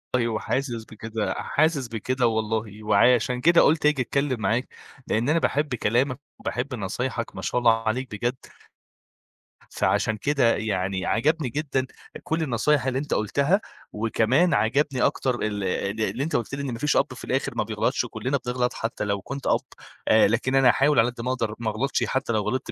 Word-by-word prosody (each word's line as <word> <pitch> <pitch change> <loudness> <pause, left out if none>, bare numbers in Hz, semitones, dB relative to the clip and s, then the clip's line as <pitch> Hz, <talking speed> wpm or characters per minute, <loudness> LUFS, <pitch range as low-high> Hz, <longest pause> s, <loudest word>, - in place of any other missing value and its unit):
أيوه 115 -3 0
حاسس 120 -3 -2
بكده 110 0 -4
حاسس 140 +4 0
بكده 120 +2 0
والله، 110 -1 -2
وعشان 125 +4 +3
كده 170 +4 +6
قُلت 150 0 +3
آجي 150 -3 +3
اتكلّم 135 0 -1
معاك، 115 +4 0 0.4
لإن 115 +5 0
أنا 165 +2 +3
باحب 145 -4 0
كلامك 125 +5 0 0.2
وباحب 130 +2 -3
نصايحك 115 +3 -3
ما - - -6
شاء 125 - 0
الله 115 -2 +3
عليك 125 +2 -1
بجد 120 +4 -1 1.4
فعشان 110 -1 +1
كده 135 -1 +2
يعني 95 -3 -2
عجَبني 150 +3 +1
جدًا 135 -1 -1 0.4
كلّ 160 0 -1
النصايح 130 +1 +1
اللي 130 0 0
أنت 145 0 -3
قُلتها، 140 - +1 0.3
وكمان 115 - +2
عجَبني 130 +4 +1
أكتر 130 -2 +1
اللي 100 -2 -1
اللي 110 -1 -1
اللي 120 +8 -3
أنت 165 - -2
قُلت 120 +3 -1
لي 140 - -5
إن 135 -3 -3
ما 115 - -6
فيش 150 +3 +1
أب - - +1
في - - -11
الآخر - - -1
ما - - +1
بيغلطش - - 0
و - - -7
كلّنا 135 +2 -2
بنغلط 125 0 0
حتّى 115 -1 -3
لو 100 -1 -1
كنت 140 +4 -6
أب، - - +3 0.5
آآ 110 - +6
لكن 120 +5 0
أنا 135 -1 +5
هاحاول 140 0 +3
على 115 +2 +4
قَد 120 -1 -8
ما 125 +2 -1
اقدر 115 -4 -2
ما 110 -2 -1
اغلطش 135 +6 -1
حتّى 130 -3 -1
لو 110 - +1
غلطت 105 +6 -3
125 Hz, 185 wpm, -25 LUFS, 110-140 Hz, 1.4 s, كده